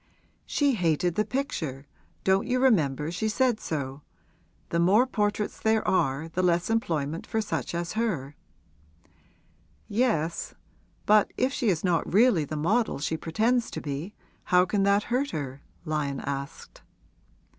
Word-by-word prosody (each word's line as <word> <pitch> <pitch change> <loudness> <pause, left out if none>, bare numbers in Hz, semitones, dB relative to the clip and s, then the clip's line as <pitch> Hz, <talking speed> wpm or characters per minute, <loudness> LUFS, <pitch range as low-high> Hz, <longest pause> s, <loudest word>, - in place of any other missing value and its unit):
'She 285 -2 +2
hated 175 -3 +1
the 215 - +1
picture 180 - -3 0.4
don't 190 +4 +2
you 255 0 +1
remember 155 - +2
she 220 +5 -1
said 245 0 +1
so? 140 -5 -4 0.7
The 170 - 0
more 200 +8 +5
portraits 210 -4 -1
there 220 0 +1
are 140 -3 +1
the 170 +3 -2
less 175 +2 +1
employment 165 -8 -1
for 220 - -1
such 165 - -3
as 170 0 -3
her.' 175 - -2 1.5
'Yes; 200 -8 0 0.5
but 210 0 +4
if 260 +2 +1
she 240 -7 0
is 170 -5 0
not 175 -3 +1
really 200 -6 +4
the 155 +2 -5
model 215 +10 +1
she 150 +3 -2
pretends 225 +10 0
to - - -5
be, 150 +8 -5 0.3
how 180 -1 +4
can 200 +2 0
that 200 +1 +3
hurt 275 +3 +1
her?' 140 - -5 0.2
Lyon 150 -3 -2
asked. 140 0 -6
180 Hz, 145 wpm, -27 LUFS, 155-220 Hz, 1.5 s, more